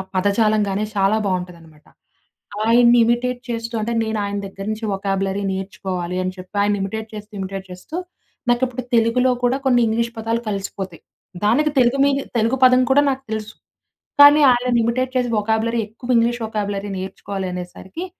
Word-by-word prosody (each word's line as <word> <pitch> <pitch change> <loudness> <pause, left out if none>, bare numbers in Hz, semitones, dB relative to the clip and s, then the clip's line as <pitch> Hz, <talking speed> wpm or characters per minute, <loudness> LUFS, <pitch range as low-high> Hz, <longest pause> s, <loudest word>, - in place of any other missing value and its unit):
పదజాలం 210 +3 +2
గానీ, 200 +2 -1
చాలా 195 +2 +3
బావుంటదనమాట. 175 -5 -5 0.8
ఆయన్ని 240 +1 +6
ఇమిటేట్ 245 +1 0
చేస్తూ 230 0 -4
అంటే 235 +2 -2
నేను 220 -1 -2
ఆయన 200 0 -3
దగ్గర 195 0 -9
నుంచి 220 +1 -4
వొకబ్యూలరీ 195 0 -1
నేర్చుకోవాలి 185 -2 -4
అని 185 0 -3
చెప్పి, 185 +3 -12
ఆయన్ని 205 0 +1
ఇమిటేట్ 220 +3 -4
చేస్తూ, 210 +1 -9
ఇమిటేట్ 195 0 -5
చేస్తూ, 185 - -9 0.6
నాకు 240 +1 +1
ఇప్పుడు 255 0 -6
తెలుగులో 240 +3 +3
కూడా, 255 +3 +2
కొన్ని 245 -2 +4
ఇంగ్లీష్ 235 +1 0
పదాలు 225 +1 -1
కలిసిపోతాయి. 195 -3 -5 0.4
దానికి 295 +8 +3
తెలుగు 245 +2 +3
మీన్ 280 0 +1 0.2
తెలుగు 230 +4 +1
పదం 255 0 +5
కూడా, 285 +2 +5
నాకు 270 0 -5
తెలుసు. 215 0 -4 0.7
కానీ, 290 +1 +9
ఆయనని 245 -1 +2
ఇమిటేట్ 255 +2 -1
చేసి 245 -1 0
వొకబ్యూలరీ 220 +2 0
ఎక్కువ 235 +4 -12
ఇంగ్లీష్ 235 +1 +1
వొకబ్యూలరీ 205 -2 -3
నేర్చుకోవాలనేసరికి, 190 - -6
220 Hz, 150 wpm, -20 LUFS, 195-240 Hz, 0.8 s, కానీ